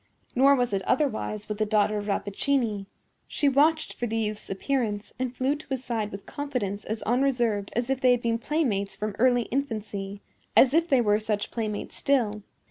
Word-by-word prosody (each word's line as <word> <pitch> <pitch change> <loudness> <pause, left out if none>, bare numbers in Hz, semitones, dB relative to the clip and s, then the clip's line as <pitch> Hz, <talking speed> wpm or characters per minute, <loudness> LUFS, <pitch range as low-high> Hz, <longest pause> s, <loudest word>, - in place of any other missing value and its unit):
Nor 275 +3 +6
was 245 -4 0
it 195 - +1
otherwise 220 -6 0
with 210 0 -4
the - - +3
daughter 210 0 +2
of 205 - -6
Rappaccini. 210 +1 0 0.4
She 290 - 0
watched 300 +4 +3
for 240 - -3
the 225 0 -2
youth's 215 -1 -3
appearance, 210 0 -2
and 255 -1 -2
flew 265 +3 +1
to 300 - -12
his 265 -2 -2
side 220 -3 -2
with 200 0 -8
confidence 235 -9 -3
as 220 +1 -4
unreserved 240 -5 +1
as 240 +1 0
if 270 0 -1
they 255 - +5
had 245 -1 +3
been 230 0 +1
playmates 235 -9 -1
from 210 -1 -4
early 245 0 +4
infancy—as 215 -1 0
if 330 +2 +3
they 265 -3 +5
were 210 -2 +3
such 215 -1 -2
playmates 215 -3 -4
still. 230 -7 +1
230 Hz, 185 wpm, -27 LUFS, 210-265 Hz, 0.4 s, Nor